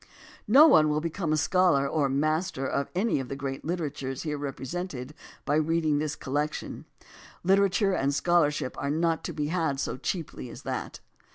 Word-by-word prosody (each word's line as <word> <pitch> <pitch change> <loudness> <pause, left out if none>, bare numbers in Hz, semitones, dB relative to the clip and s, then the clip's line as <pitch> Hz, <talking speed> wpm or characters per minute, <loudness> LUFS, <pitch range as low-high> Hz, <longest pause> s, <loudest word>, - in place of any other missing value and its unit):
No 270 +9 +8
one 155 - +6
will 150 0 +1
become 165 +1 -3
a 155 - +2
scholar 160 -3 +3
or 145 0 +1
a - - -4
master 155 +1 0
of 140 - -1
any 200 -3 +1
of 130 -2 -5
the 135 - -4
great 135 -1 -5
literatures 145 -6 -3
here 150 -2 -2
represented 140 0 -5 0.3
by 145 +1 +2
reading 155 -1 +1
this 150 -1 -2
collection. 145 +3 -3 0.6
Literature 195 +1 +3
and 140 -5 +1
scholarship 150 -3 +1
are 140 - -2
not 165 +1 0
to - - -3
be 150 -1 -3
had 160 -5 0
so - - -2
cheaply 155 -4 -4
as - - -10
that. - - -5
155 Hz, 175 wpm, -27 LUFS, 140-175 Hz, 0.6 s, No